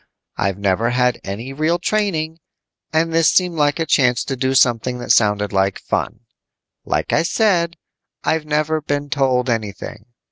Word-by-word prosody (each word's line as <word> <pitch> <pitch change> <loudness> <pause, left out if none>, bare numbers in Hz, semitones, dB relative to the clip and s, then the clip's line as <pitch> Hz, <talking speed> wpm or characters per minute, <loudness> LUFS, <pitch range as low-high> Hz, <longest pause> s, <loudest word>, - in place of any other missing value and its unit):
I've 100 0 -1
never 100 +3 +1
had 125 0 +1
any 115 +7 -6
real 155 +4 +1
training, 170 -5 -1 0.5
and 165 +1 +1
this 165 -1 +4
seemed 180 -2 +2
like 145 -2 +1
a 165 - -1
chance 125 -5 +2
to 135 - -3
do 130 +1 -1
something 125 0 +2
that 120 - -2
sounded 105 -2 +2
like 95 0 +1
fun. - - -3 0.6
"Like - - -1
I - - +4
said, 170 -2 +1 0.5
I've 160 -1 0
never 155 +1 0
been 145 -1 -3
told 130 -2 +1
anything. 110 -1 -4
135 Hz, 155 wpm, -19 LUFS, 115-160 Hz, 0.6 s, this